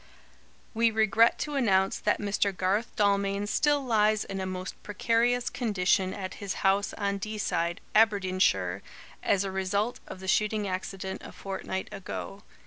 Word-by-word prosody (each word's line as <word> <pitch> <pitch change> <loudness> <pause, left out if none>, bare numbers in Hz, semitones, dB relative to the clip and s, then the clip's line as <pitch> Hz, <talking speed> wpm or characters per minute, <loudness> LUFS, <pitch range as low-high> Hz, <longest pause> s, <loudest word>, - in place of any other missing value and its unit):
"We 230 0 +3
regret 220 +1 +4
to 295 - -4
announce 195 -8 +2
that - - +1
Mr. 200 -2 0
Garth 200 +5 0
Dalmain 200 -1 +1
still 290 +5 +1
lies 215 -2 +3
in 195 -1 -5
a 190 - -3
most 185 0 -6
precarious 235 +3 +1
condition 195 -5 +1
at 190 -1 -5
his 200 -1 -4
house 195 +1 +3
on 200 -1 -1
Deeside, 190 -5 -2
Aberdeenshire, 185 - +2 0.4
as 200 -1 +2
a 195 - -3
result 200 +5 -1
of - - -8
the 190 - -8
shooting 210 +1 +1
accident 190 0 -4
a - - -9
fortnight 190 -1 -5
ago. 195 0 -6
200 Hz, 145 wpm, -28 LUFS, 190-215 Hz, 0.4 s, regret